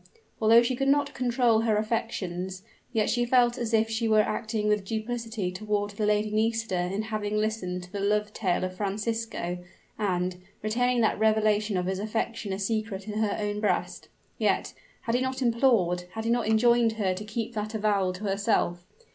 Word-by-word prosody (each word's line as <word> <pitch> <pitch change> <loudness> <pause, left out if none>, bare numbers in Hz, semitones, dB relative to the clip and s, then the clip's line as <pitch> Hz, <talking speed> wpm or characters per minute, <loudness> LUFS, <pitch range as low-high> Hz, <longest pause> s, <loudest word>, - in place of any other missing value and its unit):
Although 225 +2 +7
she 250 +2 0
could 270 +2 -1
not 285 0 +2
control 240 -2 +2
her 220 -2 +2
affections, 190 -4 -3 0.3
yet 220 -3 +1
she 240 - +1
felt 240 -1 +3
as 235 -2 -2
if 225 0 +3
she 225 +1 -1
were 215 -1 +5
acting 215 0 -2
with 210 -1 +2
duplicity 220 -2 -3
toward 205 +1 -2
the 210 +1 -1
Lady 210 0 +1
Nisida 215 -5 0
in 205 +3 -2
having 215 -1 -2
listened 210 -4 -2
to 180 - -13
the 200 - -4
love 210 +1 0
tale 185 -4 0
of 185 0 -3
Francisco, 210 -2 -2 0.4
and, 180 -3 0 0.3
retaining 245 +3 +1
that 220 - +2
revelation 215 -2 +2
of 180 - -1
his 190 +1 -2
affection 220 0 -2
a 190 - -2
secret 215 -1 -2
in 210 0 -3
her 215 -2 0
own 205 0 -2
breast. 205 -4 -1 0.3
Yet - - +1 0.3
had 230 - -2
he 245 - +2
not 260 0 -2
implored, 230 -8 +2
had 220 0 -4
he 230 - +1
not 240 -2 +1
enjoined 230 +1 +4
her 200 -4 0
to 190 +3 -6
keep 225 +2 -4
that 215 0 -4
avowal 205 -3 +1
to 185 +3 -9
herself? 195 -3 0
215 Hz, 185 wpm, -27 LUFS, 200-230 Hz, 0.4 s, Although